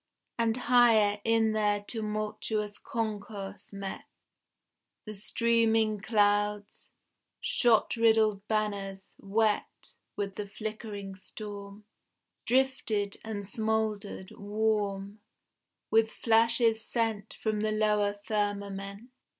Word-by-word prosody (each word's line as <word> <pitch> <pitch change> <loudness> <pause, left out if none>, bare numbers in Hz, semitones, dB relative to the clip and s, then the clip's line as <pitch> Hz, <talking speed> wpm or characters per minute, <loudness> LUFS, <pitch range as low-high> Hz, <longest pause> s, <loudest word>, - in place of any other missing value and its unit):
And 230 0 +2
higher, 225 -5 +4
in 225 -1 +3
their 210 -1 +1
tumultuous 215 -1 -3
concourse 205 -3 -5
met, 195 -1 -6 1.0
The 215 - -6
streaming 225 0 +2
clouds, 205 -1 +1 0.5
shot 235 -3 +3
riddled 220 -3 +3
banners, 200 -3 -2
wet 210 +1 -1 0.2
With 200 -1 -3
the 210 - -4
flickering 210 -1 -6
storm, 200 +1 -8 0.6
Drifted 250 -6 +1
and 205 -3 -5
smouldered, 215 -2 -1
warm 205 -1 -1 0.7
With 225 0 +4
flashes 230 0 +3
sent 225 -3 -1
From 215 -1 -1
the 215 0 0
lower 210 -1 +2
firmament. 200 +1 -3
215 Hz, 90 wpm, -30 LUFS, 205-220 Hz, 1.0 s, higher